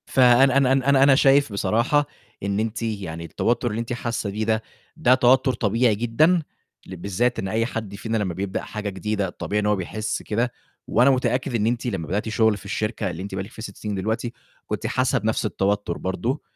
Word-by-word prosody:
فأنا 130 +1 +5
أنا 135 -2 +3
أنا 135 0 +1
أنا 135 -1 +5
أنا 140 -1 +6
شايف 140 -3 +4
بصراحة 120 +8 +2 0.4
إن 100 +1 -1
أنتِ 110 +1 -2
يعني 95 -7 -4
التوتّر 120 +7 0
اللي 105 +1 -3
أنتِ 115 +1 -4
حاسّة 115 -3 -3
بيه 105 +2 -2
ده، 110 0 +1 0.4
ده 130 -6 +4
توتّر 130 +1 +4
طبيعي 115 +1 +2
جدًا، 155 - +2 0.4
ل 95 - -7
بالذات 100 +7 -1
إن 95 - -3
أي 110 +4 0
حد 110 -4 -5
فينا 110 +2 -2
لمّا 100 -5 -1
بيبدأ 95 +2 -3
حاجة 105 -1 -5
جديدة، 100 +1 -2
الطبيعي 100 +3 -3
إن - - -2
هو 105 0 +3
بيحِس 105 +3 -3
كده 115 +3 -1 0.4
وأنا 125 +3 +4
متأكد 130 -1 0
إن 110 -1 +1
أنتِ 120 0 -1
لمّا 95 -8 -3
بدأتِ 105 +3 -2
شُغل 110 -1 +2
في 95 - -14
الشركة 105 -2 -2
اللي 85 0 -6
أنتِ 100 -1 -6
بقى 95 - -2
لك 100 - -12
فيها - - -10
6 100 -4 -8
سنين 105 -1 -4
دلوقتي، 110 +5 -2 0.3
كنتِ - - -3
حاسّة 130 +1 +1
بنَفْس 110 +1 -1
التوتّر 100 -3 -1
برضه. 120 +9 -2
110 Hz, 205 wpm, -23 LUFS, 100-125 Hz, 0.4 s, أنا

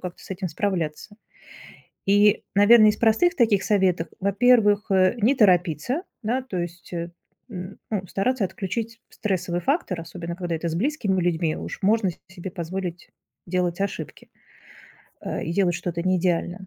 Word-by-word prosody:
как-то 180 -1 -8
с - - -14
этим 185 -1 -3
справляться". 170 +1 -3 0.9
И, 205 +1 +4
наверное, 215 +2 +7
из 210 - -1
простых 235 - +3
таких 220 -5 +3
советов, 185 -4 +1
во-первых, 205 +1 +3
э, 185 -1 +4
не 245 +7 +4
торопиться, 190 - +2 0.2
да, 245 +5 0
то 245 -8 -6
есть, 175 0 -6
м, 180 +3 -8
ну 195 -4 -2
стараться 220 +5 0
отключить 210 +5 -4
стрессовый 185 -4 -2
фактор, 265 - -1
особенно 170 +1 -7
когда 175 -2 -3
это 170 +1 -3
с 160 - -2
близкими 200 - 0
людьми, 165 -2 0
уж - - -7
можно 205 -1 +2
с 170 - -9
себе 185 0 -8
позволить 175 0 -5 0.4
делать 180 0 -1
ошибки. 195 -6 -5 0.9
Э, - - -4
и 165 - -3
делать 180 -2 +2
что-то 170 -1 -3
не 185 0 +2
идеально. 180 +1 -1
190 Hz, 150 wpm, -24 LUFS, 175-210 Hz, 0.9 s, наверное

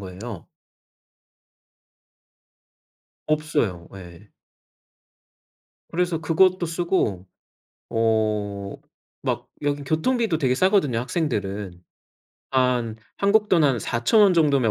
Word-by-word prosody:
거예요. 95 +1 -8 2.8
없어요. 145 - -1
예. 95 +1 -12 1.6
그래서 175 -1 -1
그것도 180 +2 +3
쓰고 165 - -1 0.6
어 105 -3 -1 0.5
막 - - -3
여기 145 0 -1
교통비도 175 - 0
되게 130 -4 +1
싸거든요, 185 - +2
학생들은. 105 - -3 0.7
한 125 -4 +1 0.2
한국 210 +1 +2
돈 170 -4 +4
한 135 -5 +2
4,000 120 - +2
원 200 -2 +6
정도면 140 -8 +3
130 Hz, 170 characters per minute, -23 LUFS, 105-170 Hz, 2.8 s, 원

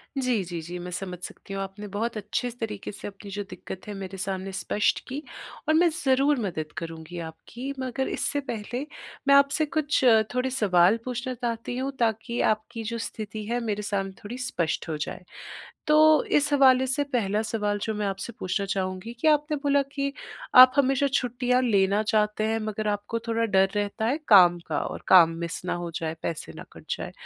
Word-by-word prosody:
जी, 250 -7 +1
जी, 170 -1 -5
जी 175 +3 -7
मैं 180 +1 -7
समझ 180 0 -5
सकती 195 - -8
हूँ 195 - -3
आपने 200 +2 -8
बहुत 230 +2 -2
अच्छे 215 +4 -2
तरीके 210 -3 -4
से 205 - -8
अपनी 200 0 -10
जो 205 +1 -3
दिक्कत 190 - -9
है 205 - -5
मेरे 195 -1 -7
सामने 190 +1 -3
स्पष्ट 205 +2 0
की, 275 +4 -5 0.5
और 310 - +4
मैं 345 +1 +5 0.2
ज़रूर 270 +1 +3
मदद 155 -4 -4
करूँगी 165 +1 -6
आपकी, 235 +12 -7
मगर 260 +1 -2
इससे 290 - 0
पहले 245 +1 -4 0.4
मैं 280 - +7
आपसे 280 +2 +4
कुछ 295 -1 0 0.3
थोड़े 250 +1 0
सवाल 200 -4 +4
पूछना 250 0 -3
चाहती 240 0 -4
हूँ 270 +1 -2
ताकि 230 +1 0
आपकी 220 +2 -1
जो 230 +2 -3
स्थिति 215 -1 -5
है, 240 +2 -1
मेरे 210 -3 -2
सामने 195 -2 -2
थोड़ी 235 +5 -6
स्पष्ट 175 - -2
हो 155 - -2
जाए। 155 - -5 0.6
तो 310 +1 +6
इस 290 0 +2
हवाले 260 -2 +5
से 285 +3 +1
पहला 210 -3 +1
सवाल 210 -2 -1
जो 220 - -1
मैं 210 -1 -2
आपसे 195 +4 -4
पूछना 195 +2 -2
चाहूँगी 190 +3 -3
कि, 315 - +3
आपने 300 0 +2
बोला 285 0 +2
कि 280 -1 -2 0.4
आप 255 0 +10
हमेशा 275 0 +3
छुट्टियाँ 250 0 +1
लेना 200 -2 +3
चाहते 215 0 +1
हैं, 225 0 0
मगर 215 0 -3
आपको 205 +3 -2
थोड़ा 230 0 +1
डर 195 -2 +3
रहता 205 +2 -1
है 275 +6 +1
काम 180 -4 +7
का - - 0
और - - -5
काम 170 -3 +8
मिस 170 +1 -3
ना 180 - -1
हो 175 -1 -4
जाए, 160 -1 -2
पैसे 165 - -4
ना - - -8
कट - - -14
जाए, - - -6
220 Hz, 190 wpm, -26 LUFS, 195-255 Hz, 0.6 s, आप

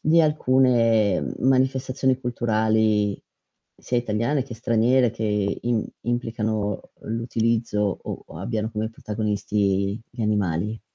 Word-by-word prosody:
di 165 +2 +4
alcune 125 - +3
manifestazioni 130 0 +2
culturali 110 -4 +1 0.6
sia 125 - -3
italiane 120 +5 0
che 125 -3 -9
straniere, 120 +2 +2
che 105 -2 -1
im 120 -2 0 0.2
implicano 110 -4 -2
l'utilizzo 115 -2 0
o - - -6
o - - -10
abbiano 110 +3 -2
come 110 0 -3
protagonisti 105 -2 -1
gli 120 -1 -5
animali? 105 0 0
110 Hz, 105 wpm, -24 LUFS, 105-120 Hz, 0.6 s, di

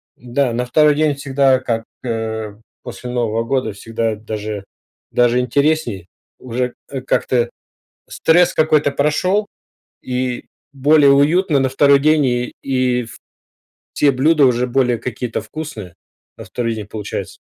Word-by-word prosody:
Да, 125 +1 -1
на 125 +1 -1
второй 150 +4 +4
день 155 0 +2
всегда, 135 -1 +2
как, 115 -3 -2 0.2
э, 110 -3 -4 0.3
после 125 0 -8
Нового 115 -2 -1
года, 115 -3 -1
всегда 115 +1 -3
даже 105 -1 -5 0.5
даже 120 0 +3
интересней. 125 - 0 0.3
Уже 125 0 -3 0.2
к 135 -2 -5
как-то 120 -3 +1 0.6
стресс 175 +2 +3
какой-то 155 -2 +3
прошел 180 +9 +1 0.6
и 125 -1 -3 0.3
более 140 +1 +5
уютно 150 +3 +3
на 135 -1 +1
второй 140 +1 +4
день, 155 0 +3
и 120 -1 -1
и 130 -2 0
в 110 - -12 0.8
те 145 - +3
блюда 145 +3 +3
уже 125 0 +1
более 125 -2 +1
какие-то 120 -1 -4
вкусные 110 - -8 0.4
на - - -10
второй 115 -2 -3
день 105 -2 -6
получаются. 105 -1 -6
125 Hz, 135 wpm, -18 LUFS, 115-140 Hz, 0.8 s, более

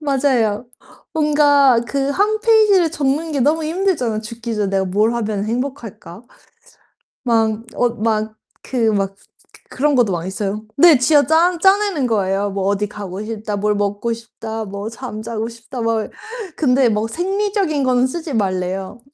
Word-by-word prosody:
맞아요. 255 -6 +1 0.5
뭔가 290 -5 +4
그 275 0 -1
1 420 +7 +1
페이지를 425 -6 +4
적는 300 +1 -1
게 280 - -1
너무 310 +5 +2
힘들잖아요. 315 - 0
'죽기 230 +1 -6
전에 205 -2 -1
내가 195 -1 +1
뭘 210 +5 +1
하면 215 -3 -2
행복할까?' 230 -6 -5 1.0
막 225 -2 +1
어 245 - +2
막 220 -1 0 0.3
그 230 -4 0
막 195 -1 -1 0.5
그 - - -14
그런 290 +2 +2
것도 235 -6 +3
많이 175 +1 -3
써요. 205 +2 -3
네. 320 -1 +7
쥐어짜 320 +6 +3
짜내는 385 -7 +3
거예요. 200 -3 0
'뭐 195 -1 -3
어디 205 +1 0
가고 200 -1 -7
싶다, 215 -1 -4
뭘 210 +1 +1
먹고 205 +3 -1
싶다, 225 -1 -6
뭐 200 +1 -6
잠자고 225 -2 -5
싶다.' 235 +2 -9
막 225 -1 -1 0.5
근데 260 -3 +3
뭐 215 0 0
생리적인 385 - -1
거는 255 -1 +2
쓰지 315 +1 -5
말래요. 190 0 -2
235 Hz, 280 characters per minute, -19 LUFS, 210-290 Hz, 1.0 s, 네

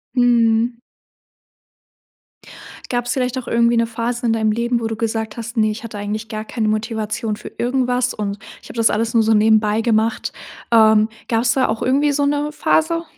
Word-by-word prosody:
Mhm. 235 -1 +2 2.1
Gab's 245 -1 -1
vielleicht 255 -1 -1
auch 255 - -5
irgendwie 235 0 +2
'ne 230 0 +2
Phase 235 +1 -3
in 230 - +2
deinem 220 -1 +1
Leben, 235 +2 0
wo 225 - -2
du 225 - -3
gesagt 220 -1 -3
hast: 230 +1 -7
„Ne, 215 -1 +3
ich 220 +2 -7
hatte 220 -2 -7
eigentlich 210 +2 -4
gar 215 0 -5
keine 220 -1 -2
Motivation 215 0 -2
für - - -10
irgendwas. 250 0 0
Und 200 -1 -4 0.2
ich - - -15
habe - - -10
das 225 -1 +4
alles 225 +2 -1
nur 230 -1 +4
so 220 +1 +3
nebenbei 215 0 +3
gemacht.“ 225 -1 0 0.4
Ähm, 220 -1 +5 0.2
gab's 230 0 +1
da 260 0 +2
auch 220 +1 -3
irgendwie 280 +3 +2
so 285 0 +1
'ne 290 +1 0
Phase? 330 +2 +1
230 Hz, 180 wpm, -19 LUFS, 220-245 Hz, 2.1 s, Ähm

